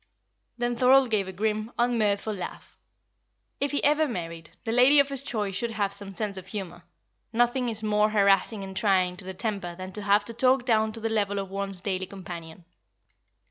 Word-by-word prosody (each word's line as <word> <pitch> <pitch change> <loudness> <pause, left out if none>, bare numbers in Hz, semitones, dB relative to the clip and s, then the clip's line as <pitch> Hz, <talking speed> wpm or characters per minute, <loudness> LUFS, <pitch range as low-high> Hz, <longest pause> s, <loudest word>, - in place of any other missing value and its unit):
Then 240 0 -1
Thorold 255 0 +5
gave 200 -3 +1
a - - -5
grim, 215 +3 -2
unmirthful 220 -3 +1
laugh. 180 - -8 0.8
If 280 - 0
he 285 - -1
ever 300 +2 +3
married, 165 - -6
the 225 - -2
lady 255 +5 +6
of 280 0 +4
his 275 -2 -1
choice 210 -7 -3
should 230 +5 -2
have 205 -3 -1
some 200 0 -4
sense 200 0 -2
of 190 0 -8
humour; 185 -4 -6 0.5
nothing 240 +2 +1
is 220 -1 -4
more 210 0 +3
harassing 200 0 +2
and 190 0 -8
trying 185 -4 +2
to 185 - -9
the 190 0 -6
temper 195 -4 -3
than 185 +1 -7
to 210 - -5
have 205 +1 +3
to 230 - -4
talk 255 +2 +2
down 220 -3 +2
to 225 - -6
the 225 - -2
level 205 -2 0
of 195 -1 -4
one's 195 -2 -2
daily 190 -1 -2
companion. 175 -3 -9
210 Hz, 195 wpm, -27 LUFS, 190-235 Hz, 0.8 s, lady